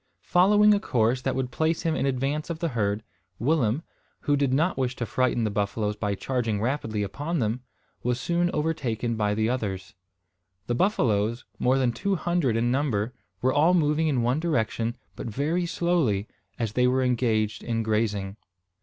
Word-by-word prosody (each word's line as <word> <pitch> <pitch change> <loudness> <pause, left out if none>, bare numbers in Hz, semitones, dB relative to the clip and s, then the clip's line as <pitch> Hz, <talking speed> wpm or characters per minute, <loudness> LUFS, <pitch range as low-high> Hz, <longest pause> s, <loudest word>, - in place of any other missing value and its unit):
Following 210 +4 +5
a 205 - +2
course 120 - +1
that - - -1
would 130 -1 -2
place 160 +5 0
him 160 -1 +1
in - - 0
advance 135 +4 -1
of 170 - -3
the 165 0 -1
herd, 105 -4 -1 0.3
Willem, 130 +1 +1 0.4
who 145 - +2
did 140 -2 +1
not 160 +7 +2
wish 130 -1 -1
to 120 - -3
frighten 120 +2 +1
the 110 - 0
buffaloes 105 +1 -1
by 105 -1 -2
charging 115 -2 -1
rapidly 110 -3 -1
upon 145 - -3
them, 115 -1 -1 0.4
was 125 0 -1
soon 175 +4 +1
overtaken 125 -7 -1
by 105 -1 0
the 110 +1 +1
others. 100 -6 -3 0.7
The 120 - -1
buffaloes 120 - +1
more 130 +2 +3
than 130 -2 +2
two 200 - -1
hundred 170 -9 0
in 120 +1 +1
number 125 -5 0 0.3
were 130 +1 +3
all 165 +5 +4
moving 155 -1 +2
in 130 -6 +1
one 125 +5 +1
direction, 115 -7 -1 0.2
but - - -6
very 155 - -1
slowly, 160 - +1 0.3
as 115 -3 -2
they 125 +1 +3
were 130 +1 +2
engaged 115 -4 0
in 115 -1 -1
grazing. 105 -2 -1
125 Hz, 175 wpm, -26 LUFS, 110-150 Hz, 0.7 s, Following